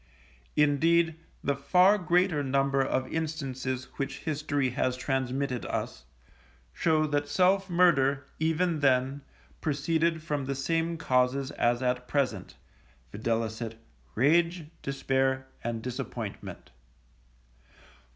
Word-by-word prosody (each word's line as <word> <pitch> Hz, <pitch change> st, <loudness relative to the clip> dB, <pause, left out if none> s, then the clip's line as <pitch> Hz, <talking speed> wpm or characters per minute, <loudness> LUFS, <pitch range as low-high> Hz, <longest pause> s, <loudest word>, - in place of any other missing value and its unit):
Indeed, 160 Hz, +3 st, +3 dB, 0.3 s
the 140 Hz, -, +1 dB
far 180 Hz, +8 st, +4 dB
greater 180 Hz, -3 st, +2 dB
number 135 Hz, 0 st, +1 dB
of 130 Hz, -1 st, -2 dB
instances 135 Hz, -5 st, -3 dB
which 135 Hz, -1 st, -4 dB
history 145 Hz, -4 st, -1 dB
has 125 Hz, +1 st, -1 dB
transmitted 130 Hz, -1 st, -1 dB
us, -, -, -4 dB, 0.7 s
show 160 Hz, -2 st, +2 dB
that 145 Hz, -1 st, -1 dB
self 185 Hz, +6 st, +2 dB
murder, 145 Hz, -6 st, +3 dB
even 160 Hz, +1 st, +1 dB
then, 135 Hz, 0 st, +2 dB, 0.4 s
proceeded 160 Hz, +2 st, 0 dB
from 145 Hz, -4 st, -2 dB
the 135 Hz, +1 st, -2 dB
same 165 Hz, +4 st, -1 dB
causes 130 Hz, -1 st, +1 dB
as 120 Hz, +1 st, +1 dB
at 125 Hz, 0 st, -1 dB
present, 140 Hz, -1 st, -1 dB, 0.6 s
viz., 115 Hz, +1 st, -2 dB, 0.5 s
rage, 165 Hz, +6 st, +3 dB, 0.2 s
despair, 135 Hz, -1 st, 0 dB, 0.2 s
and 115 Hz, -1 st, -3 dB
disappointment. 125 Hz, -1 st, -6 dB
140 Hz, 100 wpm, -28 LUFS, 130-160 Hz, 0.7 s, far